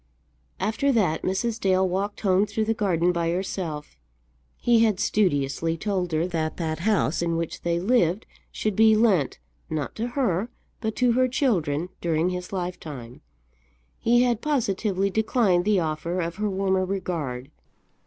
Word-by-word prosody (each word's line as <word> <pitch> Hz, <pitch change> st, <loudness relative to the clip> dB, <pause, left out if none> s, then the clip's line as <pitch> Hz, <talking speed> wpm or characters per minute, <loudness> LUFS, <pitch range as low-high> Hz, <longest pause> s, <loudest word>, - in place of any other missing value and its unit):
After 220 Hz, +8 st, +1 dB
that 180 Hz, -9 st, +1 dB
Mrs. 220 Hz, +5 st, -1 dB
Dale 190 Hz, -2 st, +2 dB
walked 195 Hz, +3 st, -2 dB
home 195 Hz, 0 st, +3 dB
through 215 Hz, +1 st, -1 dB
the 225 Hz, -, +1 dB
garden 180 Hz, -5 st, +1 dB
by 170 Hz, -1 st, -1 dB
herself. 170 Hz, -, -4 dB, 0.6 s
He 235 Hz, -1 st, +3 dB
had 215 Hz, -5 st, +2 dB
studiously 165 Hz, -4 st, +1 dB
told 185 Hz, -2 st, -2 dB
her 160 Hz, +1 st, +1 dB
that 160 Hz, -3 st, -2 dB
that 160 Hz, -2 st, -2 dB
house 195 Hz, -4 st, +1 dB
in 170 Hz, -1 st, 0 dB
which 165 Hz, -1 st, -4 dB
they 170 Hz, 0 st, 0 dB
lived 195 Hz, -1 st, +2 dB, 0.3 s
should 215 Hz, -2 st, -2 dB
be 220 Hz, +1 st, +6 dB
lent, 205 Hz, -, +2 dB, 0.3 s
not 155 Hz, -4 st, -3 dB
to 230 Hz, +2 st, -1 dB
her, 220 Hz, -4 st, +1 dB, 0.3 s
but 220 Hz, -2 st, -3 dB
to 250 Hz, -1 st, +3 dB
her 255 Hz, +2 st, +3 dB
children, 180 Hz, -, 0 dB
during 170 Hz, +1 st, +1 dB
his 180 Hz, 0 st, -5 dB
lifetime. 155 Hz, -10 st, -6 dB, 0.8 s
He 240 Hz, +1 st, +4 dB
had 240 Hz, -2 st, +1 dB
positively 200 Hz, -8 st, 0 dB
declined 215 Hz, -4 st, +2 dB
the 210 Hz, -2 st, +3 dB
offer 165 Hz, +2 st, -2 dB
of 170 Hz, 0 st, -3 dB
her 210 Hz, 0 st, 0 dB
warmer 190 Hz, -1 st, +1 dB
regard. 165 Hz, -9 st, -3 dB
185 Hz, 155 wpm, -25 LUFS, 165-215 Hz, 0.8 s, be